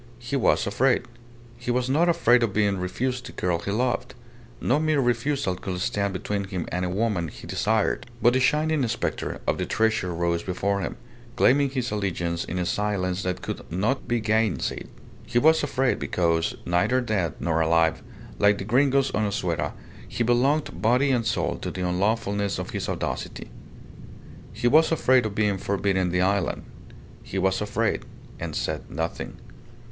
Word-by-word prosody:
He 120 Hz, +3 st, -4 dB
was 130 Hz, -, +3 dB
afraid. 125 Hz, +6 st, +2 dB, 0.6 s
He 120 Hz, -, -6 dB
was 125 Hz, +1 st, +1 dB
not 160 Hz, +6 st, +3 dB
afraid 125 Hz, -8 st, +4 dB
of 115 Hz, -4 st, 0 dB
being 100 Hz, -2 st, +1 dB
refused 125 Hz, +7 st, -2 dB
the -, -, -8 dB
girl 90 Hz, -2 st, 0 dB
he 85 Hz, -, -5 dB
loved 125 Hz, +3 st, -1 dB, 0.4 s
no 135 Hz, +4 st, +2 dB
mere 155 Hz, -2 st, +2 dB
refusal 125 Hz, -2 st, +1 dB
could 90 Hz, 0 st, -5 dB
stand 100 Hz, -1 st, 0 dB
between 100 Hz, +2 st, -3 dB
him 95 Hz, -3 st, -4 dB
and 90 Hz, +1 st, -1 dB
a 90 Hz, -, -1 dB
woman 100 Hz, -3 st, 0 dB
he -, -, -11 dB
desired 110 Hz, 0 st, 0 dB
but 120 Hz, 0 st, +4 dB
the 130 Hz, -, +3 dB
shining 150 Hz, +1 st, +2 dB
spectre 115 Hz, -, -3 dB
of -, -, 0 dB
the -, -, -2 dB
treasure 110 Hz, -5 st, +1 dB
rose 85 Hz, 0 st, 0 dB
before 100 Hz, +2 st, -1 dB
him, 85 Hz, -, -4 dB, 0.4 s
claiming 140 Hz, +2 st, +4 dB
his 130 Hz, -2 st, -2 dB
allegiance 85 Hz, -5 st, -1 dB
in 90 Hz, -, -5 dB
a 90 Hz, -, 0 dB
silence 95 Hz, -2 st, -1 dB
that 90 Hz, -1 st, -3 dB
could -, -, -6 dB
not 105 Hz, +10 st, -1 dB
be 120 Hz, 0 st, +1 dB
gainsaid. 110 Hz, 0 st, 0 dB, 0.4 s
He -, -, -1 dB
was 160 Hz, +5 st, +5 dB
afraid, 135 Hz, -3 st, 0 dB
because, 85 Hz, -2 st, 0 dB
neither 90 Hz, +9 st, +2 dB
dead 105 Hz, -, -1 dB
nor 80 Hz, -1 st, +1 dB
alive, 80 Hz, 0 st, +2 dB, 0.4 s
like 105 Hz, 0 st, +4 dB
the -, -, -4 dB
Gringos 135 Hz, +5 st, +2 dB
on 110 Hz, -1 st, 0 dB
Azuera, 90 Hz, -4 st, -1 dB, 0.3 s
he 120 Hz, -, -1 dB
belonged 130 Hz, +6 st, +1 dB
body 125 Hz, +5 st, +3 dB
and 120 Hz, -3 st, +1 dB
soul -, -, 0 dB
to -, -, -4 dB
the 90 Hz, -1 st, -3 dB
unlawfulness 100 Hz, +1 st, 0 dB
of -, -, -5 dB
his -, -, -3 dB
audacity. -, -, -4 dB, 1.0 s
He 120 Hz, -, -1 dB
was 155 Hz, +6 st, +5 dB
afraid 130 Hz, -7 st, +3 dB
of 100 Hz, -, -8 dB
being 105 Hz, -3 st, +1 dB
forbidden 95 Hz, -2 st, 0 dB
the 90 Hz, +1 st, +1 dB
island. 95 Hz, 0 st, 0 dB, 0.6 s
He 95 Hz, -, -6 dB
was 95 Hz, +1 st, +1 dB
afraid, 105 Hz, 0 st, 0 dB, 0.4 s
and -, -, -5 dB
said -, -, -3 dB
nothing. 80 Hz, +1 st, -4 dB
105 Hz, 170 wpm, -25 LUFS, 90-125 Hz, 1.0 s, was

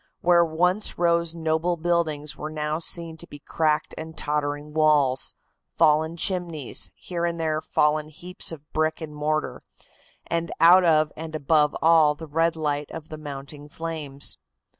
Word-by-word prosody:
Where 175 Hz, 0 st, +5 dB
once 180 Hz, +5 st, +1 dB
rose 170 Hz, -1 st, +1 dB
noble 165 Hz, +2 st, 0 dB
buildings 160 Hz, -3 st, -1 dB
were 155 Hz, -, -6 dB
now 155 Hz, 0 st, -2 dB
to 170 Hz, 0 st, -2 dB
be 145 Hz, -, -10 dB
seen -, -, -23 dB
cracked 155 Hz, -1 st, 0 dB
and 160 Hz, 0 st, -8 dB
tottering 145 Hz, 0 st, -2 dB
walls, 150 Hz, -4 st, +2 dB, 0.4 s
fallen 155 Hz, +2 st, +3 dB
chimneys, 170 Hz, -7 st, 0 dB
here 175 Hz, -2 st, -5 dB
and 170 Hz, -1 st, -1 dB
there 155 Hz, -1 st, 0 dB
fallen 150 Hz, 0 st, +1 dB
heaps 175 Hz, +4 st, -5 dB
of 150 Hz, -2 st, -10 dB
brick 155 Hz, 0 st, 0 dB
and 155 Hz, -2 st, -7 dB
mortar, 150 Hz, +1 st, -2 dB, 0.6 s
and 170 Hz, 0 st, -2 dB
out 180 Hz, +3 st, +7 dB
of 155 Hz, -2 st, +3 dB
and 160 Hz, 0 st, -7 dB
above 150 Hz, 0 st, +2 dB
all 160 Hz, -2 st, +5 dB
the 160 Hz, -, -9 dB
red 165 Hz, +2 st, +1 dB
light 145 Hz, -2 st, -2 dB
of 160 Hz, -1 st, -9 dB
the 155 Hz, -, -7 dB
mounting 145 Hz, 0 st, -8 dB
flames. 155 Hz, -3 st, -3 dB
155 Hz, 155 wpm, -25 LUFS, 150-165 Hz, 0.6 s, out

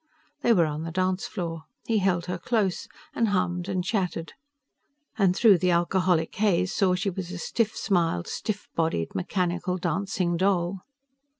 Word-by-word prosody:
They 240 Hz, -, +3 dB
were 175 Hz, -7 st, +5 dB
on 150 Hz, 0 st, -3 dB
the 165 Hz, -, -4 dB
dance 185 Hz, +2 st, 0 dB
floor. 165 Hz, -5 st, -5 dB, 0.2 s
He 225 Hz, -2 st, +2 dB
held 185 Hz, -3 st, +1 dB
her 180 Hz, -1 st, -3 dB
close, 210 Hz, -6 st, 0 dB, 0.3 s
and 230 Hz, -, +1 dB
hummed 180 Hz, -2 st, 0 dB
and 185 Hz, -2 st, -1 dB
chatted. 180 Hz, -5 st, -2 dB, 0.8 s
And 190 Hz, -4 st, +3 dB
through 205 Hz, -4 st, +6 dB
the 180 Hz, +1 st, +2 dB
alcoholic 175 Hz, -1 st, +2 dB
haze 190 Hz, -3 st, +1 dB
saw 185 Hz, -2 st, +3 dB
she 195 Hz, +2 st, -1 dB
was 180 Hz, -1 st, -5 dB
a 180 Hz, -, -5 dB
stiff 220 Hz, +5 st, -1 dB
smiled, 170 Hz, -, +1 dB
stiff 210 Hz, -2 st, -4 dB
bodied, 160 Hz, -, -1 dB
mechanical 180 Hz, -, -1 dB
dancing 180 Hz, 0 st, -1 dB
doll. 185 Hz, 0 st, +1 dB
180 Hz, 160 wpm, -26 LUFS, 170-195 Hz, 0.8 s, through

